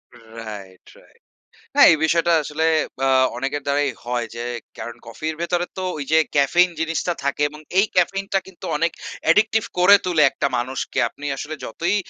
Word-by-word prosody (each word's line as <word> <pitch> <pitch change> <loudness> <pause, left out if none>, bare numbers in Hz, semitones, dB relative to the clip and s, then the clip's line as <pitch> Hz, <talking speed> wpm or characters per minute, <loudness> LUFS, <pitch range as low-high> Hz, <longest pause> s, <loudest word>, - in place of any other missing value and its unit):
Right, 110 -5 -10
right. - - -23 0.5
হ্যাঁ, - - +8
এই - - +1
বিষয়টা 170 +1 +2
আসলে 150 +2 -2 0.4
আ - - +2 0.3
অনেকের 135 +3 -2
দ্বারাই 140 0 +1 0.2
হয় 120 -1 -2
যে 120 +1 -5 0.3
কারণ 115 +1 -7
কফির 155 +8 -4
ভেতরে 175 0 0
তো 185 - -3
ওই 145 - -3
যে 160 - +6 0.2
ক্যাফেইন 170 +6 +4
জিনিসটা 165 +2 -1
থাকে 140 +1 -1
এবং 150 +1 -12 0.2
এই 200 - +5
ক্যাফেইনটা 195 +2 +1
কিন্তু 190 -2 -11
অনেক 165 +2 +1 0.4
addictive 220 +1 +3
করে 185 +3 +8
তুলে 175 -4 +2
একটা 140 - -1
মানুষকে। 130 +2 -3
আপনি 145 - -11
আসলে 150 +3 -5
যতই 170 - -1
150 Hz, 165 wpm, -21 LUFS, 125-175 Hz, 0.5 s, হ্যাঁ